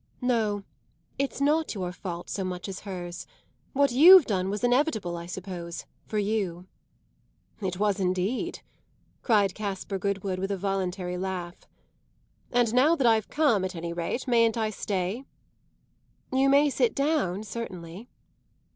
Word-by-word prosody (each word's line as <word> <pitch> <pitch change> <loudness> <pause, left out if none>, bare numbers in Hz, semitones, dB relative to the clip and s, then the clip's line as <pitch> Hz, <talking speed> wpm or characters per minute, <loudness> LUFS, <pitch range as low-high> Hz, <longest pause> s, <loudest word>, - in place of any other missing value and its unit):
"No, 220 -5 +1 0.6
it's 275 0 -1
not 300 0 +1
your 180 -3 -3
fault 175 -1 -6
so 195 - -3
much 180 0 -4
as 195 -1 -5
hers. 175 -2 -6 0.5
What 280 -1 +3
you've 330 +6 +9
done 190 -3 -1
was 205 +3 -3
inevitable, 245 - +1
I 170 0 -7
suppose, 180 -2 -6 0.2
for 215 - -3
you." 200 -4 -1 1.0
"It 185 -2 -2
was 205 0 +1
indeed!" 190 - -1 0.6
cried 205 -5 +3
Caspar 195 -1 -4
Goodwood 195 -1 -2
with 195 +1 -2
a 200 - -1
voluntary 185 -2 -2
laugh. 180 -2 -5 0.8
"And 240 -2 +2
now 280 +7 +5
that 270 - 0
I've 220 -2 +3
come, 280 -11 +2
at 185 -1 -3
any 170 0 -4
rate, 175 +10 -3
mayn't 230 -2 +3
I 220 -1 0
stay?" 200 +3 -2 1.1
"You 265 +1 +4
may 285 +1 +5
sit 465 - +1
down, 275 - 0
certainly." 195 -2 -7
200 Hz, 140 wpm, -27 LUFS, 185-245 Hz, 1.1 s, you've